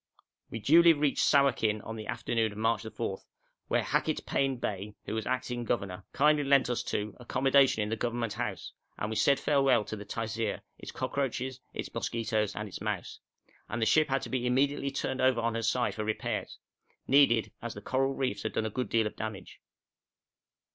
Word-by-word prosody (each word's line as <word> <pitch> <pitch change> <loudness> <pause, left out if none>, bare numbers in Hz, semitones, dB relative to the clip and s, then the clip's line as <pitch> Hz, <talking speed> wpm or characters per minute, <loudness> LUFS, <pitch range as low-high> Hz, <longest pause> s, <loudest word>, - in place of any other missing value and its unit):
We - - -5
duly 165 +9 +6
reached 145 -2 +1
Sawakin 115 -7 +3
in 110 - -5
the 110 -1 -7
afternoon 110 -2 -1
of - - -11
March 115 +1 +1
4, 95 -4 -4 0.5
where - - +1
Hackett - - 0
Pain 135 -1 0
Bey, 105 -2 -4
who - - -4
was 110 -1 -2
acting 125 -1 -2
governor, 100 -6 -2
kindly 150 +1 +3
lent 135 -2 +4
us 120 - 0
two 105 -1 -3
accommodation 135 -1 +3
in 105 - -3
the 110 - 0
Government 115 -1 -2
House, 110 -4 -4 0.2
and 105 - -3
we - - -2
said 140 +5 +3
farewell 135 -6 +3
to 110 - -5
the 105 - -7
Taisir, 110 0 -3 0.2
its - - -8
cockroaches, 130 -1 -2 0.2
its - - -5
mosquitoes, 110 -3 -1
and 105 0 -4
its 95 - -8
mouse; - - -3 0.5
and 120 - -3
the 110 - +2
ship 155 +6 +4
had 135 0 0
immediately 130 +3 +1
to - - -8
be 135 - -3
turned 130 0 -2
over 130 -2 +3
on 115 0 0
her 115 - -2
side 120 +2 +1
for 110 - -3
repairs 110 +1 -3 0.5
needed, 135 -5 +4
as 120 -2 -5
the - - -6
coral 135 +1 0
reefs 125 -7 -1
had 110 - -3
done 110 - 0
a 110 - -2
good 125 +4 -3
deal 115 -1 +2
of 105 - -4
damage. 110 -3 -6
120 Hz, 195 wpm, -30 LUFS, 110-135 Hz, 0.5 s, duly